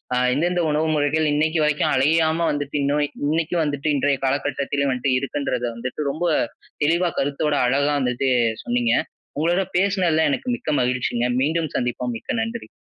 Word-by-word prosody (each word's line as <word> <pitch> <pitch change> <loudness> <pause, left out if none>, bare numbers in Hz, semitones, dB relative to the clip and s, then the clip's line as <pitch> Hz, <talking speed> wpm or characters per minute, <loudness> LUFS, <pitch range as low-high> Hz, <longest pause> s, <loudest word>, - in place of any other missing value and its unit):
அ - - +1 0.2
எந்தெந்த 175 +5 +1
உணவு 150 +2 +1
முறைகள் 150 +2 +1
இன்னைக்கு 155 +2 +1
வரைக்கும் 150 -1 +1
அழியாம 160 +4 +2
வந்துட்டு, 145 -1 -4
இன்னும் 145 +1 +1 0.3
இன்னைக்கும் 165 +1 0
வந்துட்டு, 145 0 -2
இன்றைய 140 0 +1
காலக்கட்டத்திலும் 140 +1 -1
வந்துட்டு 130 +1 -1
இருக்குன்றத 140 -2 -3
வந்துட்டு, 125 +5 -5
ரொம்ப 175 +4 -2 0.6
தெளிவாக 170 +3 +2
கருத்தோட 145 +2 0
அழகா 140 +3 +2
வந்துட்டு 125 +1 0 0.3
சொன்னீங்க. 120 -1 +1 0.5
உங்களோட 175 +4 +2
பேசினதில 185 -4 +2
எனக்கு 250 - -2
மிக்க - - -6
மகிழ்ச்சிங்க. 125 -1 0 0.2
மீண்டும் 160 +2 0
சந்திப்போம். 125 0 -2
மிக்க 225 - -3
நன்றி. 230 +1 -6
145 Hz, 145 wpm, -22 LUFS, 135-160 Hz, 0.6 s, அழியாம